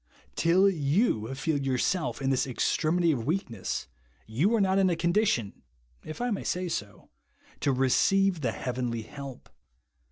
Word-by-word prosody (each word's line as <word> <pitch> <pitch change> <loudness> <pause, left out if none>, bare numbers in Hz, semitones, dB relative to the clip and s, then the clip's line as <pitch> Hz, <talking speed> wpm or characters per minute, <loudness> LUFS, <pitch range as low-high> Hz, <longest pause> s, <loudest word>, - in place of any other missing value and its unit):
Till 180 +4 +4
you 145 - +1
feel 150 +1 -1
yourself 140 +4 -1
in 135 - +1
this 130 0 +1
extremity 165 +6 +1
of 125 -5 -3
weakness, 140 - -2 0.4
ycu 135 - +1
are - - +1
not 190 -1 +2
in 190 -1 +4
a 175 - +1
condition 170 - 0 0.4
(if 155 - -8
I 245 0 -1
may 205 - -2
say 180 0 -2
so) 105 -9 -6 0.5
to 140 - +1
receive 175 +8 +2
the 120 -5 0
heavenly 120 -2 -3
help. 140 +1 -9
150 Hz, 150 wpm, -28 LUFS, 125-185 Hz, 0.5 s, Till